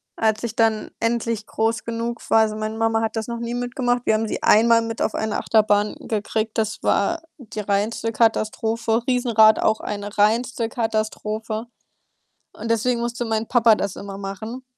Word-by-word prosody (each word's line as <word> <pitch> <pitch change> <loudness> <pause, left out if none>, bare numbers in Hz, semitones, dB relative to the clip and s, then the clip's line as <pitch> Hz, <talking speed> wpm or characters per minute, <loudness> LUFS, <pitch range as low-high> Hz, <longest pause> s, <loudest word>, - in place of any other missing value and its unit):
als 220 0 0
ich 230 -1 -4
dann 220 -1 +1
endlich 230 -1 -1
groß 225 +2 -1
genug 230 +1 -3
war. 225 - +5
Also, 215 -1 +1
meine 215 0 -4
Mama 225 0 +1
hat 225 0 -2
das 220 - -2
noch 235 -1 -4
nie 235 0 -4
mitgemacht. 245 0 -1
Wir - - +3
haben 220 +1 0
sie - - -4
einmal 230 +1 +5
mit 225 0 -5
auf - - 0
eine 220 -1 -1
Achterbahn 210 -1 +2
gekriegt. 220 0 -2
Das 215 -1 -2
war 325 +11 +1 0.2
die 220 -4 -6
reinste 210 +3 -1
Katastrophe. 225 0 +1
Riesenrad 235 -4 +5
auch 220 0 +2
eine 205 0 -5
reinste 230 +3 +1
Katastrophe 220 -1 -2 0.9
und 225 +2 -6
deswegen 235 +2 +1
musste 240 0 -2
mein 225 -1 -1
Papa 230 -3 +4
das 200 -2 -3
immer 200 -1 -8
machen. 220 +6 -6
225 Hz, 170 wpm, -22 LUFS, 215-235 Hz, 0.9 s, war